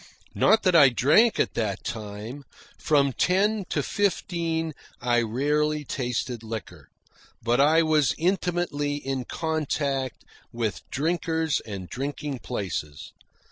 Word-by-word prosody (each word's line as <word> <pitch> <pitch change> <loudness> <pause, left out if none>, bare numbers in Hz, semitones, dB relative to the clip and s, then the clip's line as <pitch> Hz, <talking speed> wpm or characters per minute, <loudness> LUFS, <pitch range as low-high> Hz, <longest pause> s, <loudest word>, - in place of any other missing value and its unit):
Not 220 - +4
that 185 -2 +3
I 140 -5 +8
drank 150 - +4
at - - +1
that 105 -4 -2
time. 110 +5 -6 0.4
From 140 -3 +2
ten 200 - +2
to 150 - -1
fifteen 170 -5 -1 0.3
I 120 -1 +2
rarely 150 +6 0
tasted 125 -2 -3
liquor, 110 -4 -7 0.6
but 120 +3 +3
I 160 +3 +5
was 155 -5 +2
intimately 175 -5 0
in 135 -3 -3
contact 145 -5 -2 0.3
with 110 -7 -2
drinkers 160 +1 0
and 95 -4 -6
drinking 140 - -4
places. 90 - -5
145 Hz, 115 wpm, -26 LUFS, 120-160 Hz, 0.6 s, I